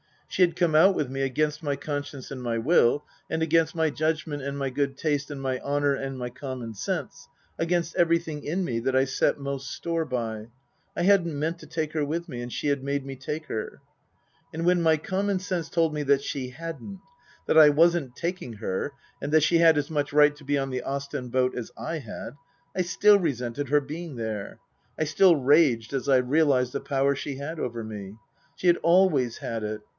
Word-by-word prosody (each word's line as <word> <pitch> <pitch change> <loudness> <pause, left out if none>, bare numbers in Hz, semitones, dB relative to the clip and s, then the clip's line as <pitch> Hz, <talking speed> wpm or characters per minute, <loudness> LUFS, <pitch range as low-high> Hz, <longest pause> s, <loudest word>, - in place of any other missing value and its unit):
She - - -3
had 175 -2 +4
come 175 -3 +1
out 185 +5 +6
with 135 -4 -2
me 135 0 -3
against 150 +3 0
my 145 -3 -1
conscience 145 -2 -5
and 130 -2 -6
my 120 -2 -1
will, 145 +2 +3 0.2
and 160 0 -1
against 160 +1 +2
my 160 -1 +2
judg 155 +1 0
ment 145 -2 -5
and 140 +1 -4
my 135 -1 -1
good 135 +1 -1
taste 145 -2 -1
and 145 -2 -6
my 130 -1 -2
honour 145 0 +1
and 135 -1 -4
my 125 -1 -4
common 125 -3 -6
sense, 100 - -4 0.3
against 170 0 0
everything 170 -3 +1
in 175 +6 -1
me 120 -9 -1
that 130 +3 -1
I 130 - +5
set 135 - +1
most 140 -1 -4
store 165 -1 -2
by. 115 -5 -3 0.5
I - - -1
hadn't 175 -5 +3
meant 165 +4 -2
to 155 - -12
take 155 0 -3
her 155 -2 0
with 170 +4 -3
me, 120 -4 -5
and 120 0 -6
she - - -3
had 140 -2 +1
made 140 0 -2
me 135 -1 -6
take 150 +4 -5
her. 110 - -5 0.7
And 165 +1 -3
when 175 0 +4
my 160 -1 +4
common 195 +5 -1
sense 180 -3 -3
told 165 -2 +1
me 150 - -2
that 140 0 +3
she 130 -2 -4
hadn't; 165 +7 -8 0.4
that - - +2
I 155 -1 +9
wasn't 160 -3 +3
taking 170 -8 -4
her, 110 +5 -3 0.3
and 145 - -3
that 155 -1 +5
she 170 +2 +4
had 165 -2 +6
as 145 +1 -1
much 145 -2 -1
right 150 0 +5
to 145 - -15
be 145 +1 +1
on 135 -1 -2
the 130 -1 -2
Ostend 140 -2 -4
boat 130 0 +1
as 120 -3 -5
I 140 +9 -4
had, 120 -1 -8 0.4
I 185 - +1
still 205 +3 +5
resented 140 -4 -2
her 145 +3 +3
being 155 +2 -7
there. 110 -3 -5 0.4
I - - +1
still 170 +4 +5
raged 140 -5 +3
as 135 +1 -2
I 135 - +6
realized 130 -1 +2
the - - -1
power 140 0 +1
she 140 0 -5
had 150 +4 -6
over 120 -4 -3
me. 105 -2 -7 0.4
She 185 - -2
had 175 - +6
always 170 -9 +3
had 115 -1 -4
it. 105 0 -4
145 Hz, 215 wpm, -26 LUFS, 130-165 Hz, 0.7 s, I